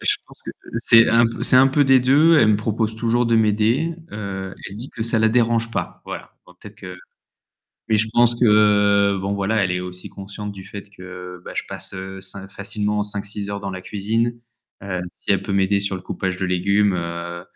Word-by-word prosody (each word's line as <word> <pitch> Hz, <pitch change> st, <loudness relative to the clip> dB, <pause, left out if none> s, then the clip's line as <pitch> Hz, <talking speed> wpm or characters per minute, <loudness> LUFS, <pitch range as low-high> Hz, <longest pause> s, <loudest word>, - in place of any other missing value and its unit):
Je -, -, +2 dB
pense -, -, -18 dB
que -, -, -5 dB, 0.3 s
c'est 115 Hz, -1 st, +6 dB
un 115 Hz, 0 st, +4 dB
p 115 Hz, -, -6 dB
c'est -, -, +5 dB
un 130 Hz, +1 st, +7 dB
peu 145 Hz, +2 st, +2 dB
des 135 Hz, -1 st, +5 dB
2, 150 Hz, +6 st, +5 dB
elle 115 Hz, -6 st, +5 dB
me 105 Hz, -, +4 dB
propose 110 Hz, +1 st, -2 dB
toujours 120 Hz, +1 st, +1 dB
de 115 Hz, -, +3 dB
m'aider, 110 Hz, +9 st, +1 dB, 0.2 s
heu, 95 Hz, -2 st, -6 dB, 0.2 s
elle 100 Hz, -, -10 dB
dit 125 Hz, +5 st, -8 dB
que 110 Hz, -, -5 dB
ça 115 Hz, 0 st, 0 dB
la 110 Hz, 0 st, +4 dB
dérange 115 Hz, -1 st, +1 dB
pas. -, -, -5 dB
Voilà, -, -, -8 dB
donc 90 Hz, 0 st, -19 dB
peut-être 105 Hz, 0 st, -12 dB
que 90 Hz, -3 st, -9 dB, 0.9 s
mais 110 Hz, -, +3 dB
je 110 Hz, -, +1 dB
pense 120 Hz, 0 st, +4 dB
que, 120 Hz, -, +2 dB
heu, 105 Hz, -2 st, +4 dB
bon 100 Hz, +1 st, -2 dB
voilà, 100 Hz, +1 st, 0 dB
elle 95 Hz, -, 0 dB
est 90 Hz, -, -1 dB
aussi 90 Hz, 0 st, -8 dB
consciente 100 Hz, +1 st, -7 dB
du 95 Hz, -1 st, -10 dB
fait 100 Hz, -1 st, -8 dB
que 90 Hz, -1 st, -10 dB
bah, -, -, -8 dB
je -, -, -1 dB
passe, -, -, -4 dB
heu, 95 Hz, 0 st, -7 dB
cin 95 Hz, 0 st, -3 dB
facilement 105 Hz, +1 st, -1 dB
5-6 100 Hz, 0 st, -2 dB
heures 100 Hz, 0 st, -4 dB
dans 100 Hz, -1 st, -5 dB
la 95 Hz, 0 st, -7 dB
cuisine. 115 Hz, +5 st, -2 dB, 0.4 s
Heu, 90 Hz, -2 st, -3 dB
si -, -, -3 dB
elle 100 Hz, -, +1 dB
peut 100 Hz, -, -5 dB
m'aider 100 Hz, +1 st, +2 dB
sur 100 Hz, -1 st, -2 dB
le -, -, -11 dB
coupage 95 Hz, 0 st, -4 dB
de 95 Hz, -, -2 dB
légumes, 100 Hz, +2 st, +2 dB
heu, 85 Hz, 0 st, -5 dB
105 Hz, 220 wpm, -21 LUFS, 95-115 Hz, 0.9 s, un